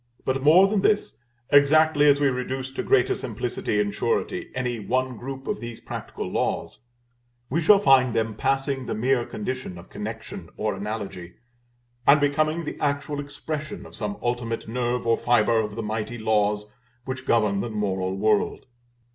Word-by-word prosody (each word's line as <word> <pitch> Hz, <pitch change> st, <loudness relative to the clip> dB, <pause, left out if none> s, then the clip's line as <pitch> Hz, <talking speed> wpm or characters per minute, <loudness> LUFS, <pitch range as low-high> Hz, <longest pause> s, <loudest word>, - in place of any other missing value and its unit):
But, 130 Hz, 0 st, 0 dB
more 165 Hz, +7 st, +7 dB
than 200 Hz, -1 st, +1 dB
this, 210 Hz, +1 st, +1 dB, 0.3 s
exactly 150 Hz, +1 st, +5 dB
as 140 Hz, 0 st, +5 dB
we 145 Hz, -1 st, +3 dB
reduce 130 Hz, +1 st, -3 dB
to 135 Hz, -, -3 dB
greater -, -, +3 dB
simplicity 105 Hz, -, -2 dB
and 105 Hz, -1 st, 0 dB
surety -, -, -1 dB
any 125 Hz, -2 st, -2 dB
one 130 Hz, +4 st, -1 dB
group 135 Hz, +3 st, -7 dB
of -, -, -2 dB
these 120 Hz, 0 st, -7 dB
practical -, -, -6 dB
laws, -, -, -2 dB, 0.7 s
we 165 Hz, +5 st, +1 dB
shall 200 Hz, +6 st, +7 dB
find 135 Hz, -, +4 dB
them 110 Hz, -1 st, 0 dB
passing 135 Hz, +3 st, -1 dB
the -, -, -2 dB
mere 120 Hz, +2 st, +1 dB
condition 110 Hz, -3 st, -5 dB
of 85 Hz, -, -13 dB
connection 105 Hz, -5 st, -7 dB
or 105 Hz, -1 st, -1 dB
analogy, 95 Hz, -3 st, -5 dB, 0.7 s
and 145 Hz, +2 st, +7 dB
becoming 155 Hz, +3 st, +1 dB
the -, -, -6 dB
actual 145 Hz, 0 st, -1 dB
expression 150 Hz, +5 st, -5 dB
of -, -, -12 dB
some 205 Hz, -, -4 dB
ultimate 120 Hz, -2 st, -2 dB
nerve 120 Hz, +1 st, -1 dB
or 115 Hz, 0 st, +3 dB
fibre 115 Hz, -1 st, +3 dB
of 105 Hz, -2 st, -2 dB
the 115 Hz, -, -4 dB
mighty 110 Hz, +2 st, -3 dB
laws 105 Hz, -1 st, +1 dB, 0.4 s
which 130 Hz, 0 st, -5 dB
govern 105 Hz, -4 st, +2 dB
the 115 Hz, -, -2 dB
moral 95 Hz, -3 st, -2 dB
world. 105 Hz, +1 st, +1 dB
125 Hz, 165 wpm, -25 LUFS, 110-140 Hz, 0.7 s, more